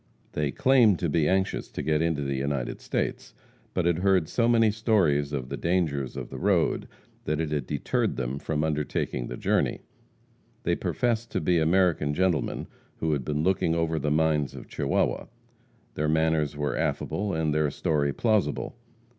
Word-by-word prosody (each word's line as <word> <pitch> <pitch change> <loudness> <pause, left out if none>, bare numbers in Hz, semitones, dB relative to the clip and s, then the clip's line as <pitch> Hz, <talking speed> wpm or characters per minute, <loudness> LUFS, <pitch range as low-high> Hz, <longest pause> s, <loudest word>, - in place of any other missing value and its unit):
They 75 -1 -1
claimed 120 - +4
to 85 -2 -1
be 75 0 +2
anxious 95 0 0
to - - -5
get 75 +1 +1
into 80 -3 0
the 70 0 -2
United 70 -2 -2
States, - - -3 0.4
but 90 - +1
had 85 -1 +2
heard 95 -4 +3
so 115 +6 +1
many 115 -2 +4
stories 95 -10 +2
of 65 -3 -3
the - - -4
dangers 80 -7 -1
of - - -6
the - - -6
road 90 -4 +1 0.4
that 75 0 -1
it 80 -2 -2
had 75 -4 -2
deterred 75 -2 -1
them 65 +2 -3
from 75 0 -2
undertaking 75 -5 -2
the - - -6
journey. - - 0 0.8
They - - +1
professed 120 -1 -1
to - - +1
be 85 +2 +2
American 80 -3 +2
gentlemen 90 -4 0 0.3
who 80 -1 0
had 70 -3 -1
been 75 +3 -1
looking 85 -2 +2
over 80 -1 0
the 75 +1 -1
mines 75 -1 +1
of - - -9
Chihuahua. - - -1 0.7
Their 75 0 -1
manners 80 -2 +1
were 75 0 -1
affable, 100 -3 -1
and 80 -2 0
their 75 -1 +2
story 75 -1 0
plausible. 110 +3 0
80 Hz, 170 wpm, -27 LUFS, 75-90 Hz, 0.8 s, claimed